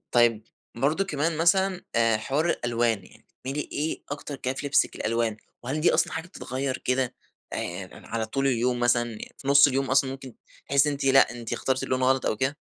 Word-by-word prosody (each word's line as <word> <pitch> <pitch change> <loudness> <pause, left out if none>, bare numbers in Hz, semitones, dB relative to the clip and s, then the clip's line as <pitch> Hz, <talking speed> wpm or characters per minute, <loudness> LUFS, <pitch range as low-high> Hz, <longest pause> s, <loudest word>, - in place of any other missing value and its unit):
طيب 115 -2 +4 0.3
برضو 145 +10 +1
كمان 155 -1 -1
مثلًا 185 +2 +3
آآ، 115 -1 +3
حوار 140 +9 0
الألوان 115 - 0
يعني - - -19
بتميلي 135 +3 -5
إيه 155 +2 -3
أكتر 145 0 -5
كده 130 -1 -3
فلبسِك 140 +1 +1
الألوان؟ 115 -1 -1 0.3
وهل 140 +5 -2
دي 170 - +4
أصلًا - - +2
حاجة 160 +2 -4
بتتغير 130 -6 -4
كده 125 -1 -1 0.4
آآ 90 +1 -4
على 115 -1 -4
طول 135 +5 -1
اليوم 125 -1 +1
مثلًا؟ 120 -2 +1 0.2
في 135 - -10
نص 140 +1 +7
اليوم 135 -1 -1
أصلًا 130 0 +3
ممكن 135 -3 -9 0.3
تحسي 140 +1 +4
إن - - -1
أنتِ 140 - -4
لأ 135 0 +5
أنتِ 115 -1 -5
اخترتِ 130 0 -1
اللون 130 - -1
الغلط 130 0 +2
أو 110 - 0
كده؟ 130 +4 -1
130 Hz, 190 wpm, -26 LUFS, 120-145 Hz, 0.4 s, نص